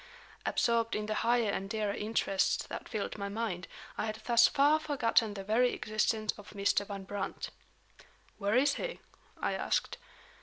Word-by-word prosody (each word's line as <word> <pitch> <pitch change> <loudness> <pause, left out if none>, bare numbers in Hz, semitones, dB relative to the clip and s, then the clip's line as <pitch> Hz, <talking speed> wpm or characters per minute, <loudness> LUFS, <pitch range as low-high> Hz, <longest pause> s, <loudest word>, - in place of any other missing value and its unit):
Absorbed 230 -1 +2
in 210 - -1
the 215 - -1
higher 230 -1 +2
and 195 0 -3
dearer 210 -1 -1
interests 210 -2 +1
that - - -7
filled 215 -2 -3
my 200 0 -3
mind, 200 -4 -3 0.3
I - - 0
had 215 - -2
thus 235 -1 +6
far 290 +3 +4
forgotten 230 -8 +2
the 195 - -5
very 230 +5 +3
existence 215 0 0
of 205 - -11
Mr. 200 0 +2
Van 200 -1 -5
Brandt. 200 0 -4 0.9
"Where 205 +1 +1
is 280 +3 +4
he?" - - -4 0.4
I - - 0
asked. - - -1
215 Hz, 160 wpm, -32 LUFS, 200-235 Hz, 0.9 s, thus